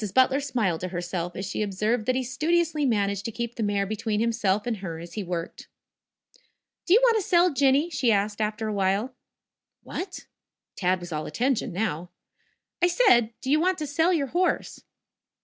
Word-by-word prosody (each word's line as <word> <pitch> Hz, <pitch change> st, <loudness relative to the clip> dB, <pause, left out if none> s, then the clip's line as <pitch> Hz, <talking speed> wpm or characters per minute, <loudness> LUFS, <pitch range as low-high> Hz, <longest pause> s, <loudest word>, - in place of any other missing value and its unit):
Butler 260 Hz, +1 st, +4 dB
smiled 230 Hz, -, -1 dB
to 185 Hz, -, -2 dB
herself 175 Hz, -1 st, -4 dB
as 190 Hz, -, -4 dB
she 205 Hz, -, -3 dB
observed 210 Hz, +3 st, -1 dB
that 255 Hz, -, +2 dB
he 260 Hz, -, 0 dB
studiously 310 Hz, +3 st, 0 dB
managed 200 Hz, -4 st, 0 dB
to 230 Hz, -, -2 dB
keep 235 Hz, +1 st, -4 dB
the 230 Hz, -, -6 dB
mare 205 Hz, -2 st, 0 dB
between 215 Hz, +1 st, -2 dB
himself 215 Hz, -3 st, +1 dB
and 235 Hz, -3 st, -1 dB
her 180 Hz, -4 st, -6 dB
as 170 Hz, +1 st, -10 dB
he 210 Hz, -, -3 dB
worked. 170 Hz, -2 st, -5 dB, 1.2 s
"Do 365 Hz, -, +6 dB
you -, -, +7 dB
want 470 Hz, -2 st, +5 dB
to -, -, +1 dB
sell 350 Hz, -2 st, +3 dB
Jinny?" 280 Hz, +5 st, +3 dB
she 245 Hz, -7 st, +2 dB
asked 205 Hz, +1 st, 0 dB
after 215 Hz, +1 st, -2 dB
a 210 Hz, -, -2 dB
little. 200 Hz, +6 st, 0 dB, 0.7 s
"What?" 365 Hz, 0 st, -6 dB, 0.5 s
Tad 185 Hz, -1 st, 0 dB
was 175 Hz, 0 st, -8 dB
all 155 Hz, -1 st, -3 dB
attention 250 Hz, -, 0 dB
now. 175 Hz, -3 st, -2 dB, 0.7 s
"I 355 Hz, -, +5 dB
said, 245 Hz, -, +3 dB
do 265 Hz, -, -2 dB
you 305 Hz, -, +4 dB
want 365 Hz, +2 st, +1 dB
to 305 Hz, -, -3 dB
sell 320 Hz, +5 st, +2 dB
your 315 Hz, -6 st, +1 dB
horse?" 360 Hz, +1 st, 0 dB
225 Hz, 185 wpm, -26 LUFS, 195-285 Hz, 1.2 s, you